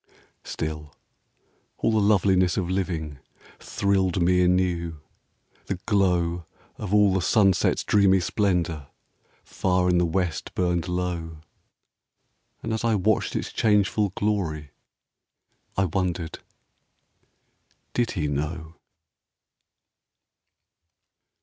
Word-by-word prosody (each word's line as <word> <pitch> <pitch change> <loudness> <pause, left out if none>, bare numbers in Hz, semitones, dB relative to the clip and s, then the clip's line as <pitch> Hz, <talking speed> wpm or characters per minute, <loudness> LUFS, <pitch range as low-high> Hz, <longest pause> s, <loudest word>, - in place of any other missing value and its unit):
Still, 75 -1 -5 0.8
all 115 - +1
the 110 - +2
loveliness 95 -3 +3
of 90 -2 -1
living 80 -7 -3 0.4
Thrilled 95 -2 0
me 90 +1 +3
anew; 90 -3 +1 0.7
the 100 - -1
glow 90 -5 +1 0.3
Of 105 -3 -6
all 105 -2 +4
the 95 - +1
sunset's 95 -2 +2
dreamy 100 -2 +4
splendor. 90 -6 -1 0.6
Far 90 -1 0
in 90 -1 +3
the 90 - +2
west 90 -1 -2
burned 90 -2 0
low. 85 -3 -3 1.2
And 115 - -2
as 110 - -2
I 115 -2 +2
watched 105 +2 +1
its - - -3
changeful 105 -1 +2
glory 80 -9 -2 1.1
I 95 - +3
wondered, 90 -2 -2 0.5
— - - -45
" - - -43
Did 120 -2 0
he 75 -3 0
know? 80 +3 -4
90 Hz, 105 wpm, -25 LUFS, 85-100 Hz, 1.2 s, all